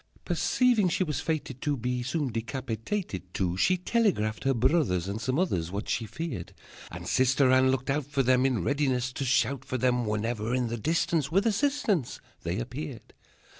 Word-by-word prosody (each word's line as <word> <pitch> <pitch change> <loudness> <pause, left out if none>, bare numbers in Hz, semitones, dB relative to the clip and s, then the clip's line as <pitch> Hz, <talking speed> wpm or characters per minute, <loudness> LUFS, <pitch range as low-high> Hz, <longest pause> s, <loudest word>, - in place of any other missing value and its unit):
Perceiving 240 -7 +2
she 180 - +1
was 150 -5 -2
fated 150 -5 -3
to 145 -2 0
Be 125 +1 -2
soon 135 +1 -1
decapitated, 115 - -4
too, 90 -2 0
She 185 - +3
telegraphed 180 - 0
her 135 - +3
brothers 120 - +2
And 100 +3 -4
some 130 +3 0
others 95 - 0
What 100 +4 -4
she 115 - -1
feared. 105 - -5 0.3
And - - -8
Sister 130 +1 +3
Anne 130 0 +5
looked 130 0 0
out 145 -1 -1
for 140 -2 0
them, 130 0 +4
In 130 -4 +1
readiness 130 -3 0
to 140 - -3
shout 135 +1 +1
for 130 -1 -3
them 125 -1 +1
Whenever 110 +2 -1
in 125 -2 0
the 120 - -3
distance 160 +2 0
With 195 +5 +3
assistance 225 - +1 0.2
They - - -2
appeared. 75 +5 -6
130 Hz, 175 wpm, -28 LUFS, 115-155 Hz, 0.3 s, Anne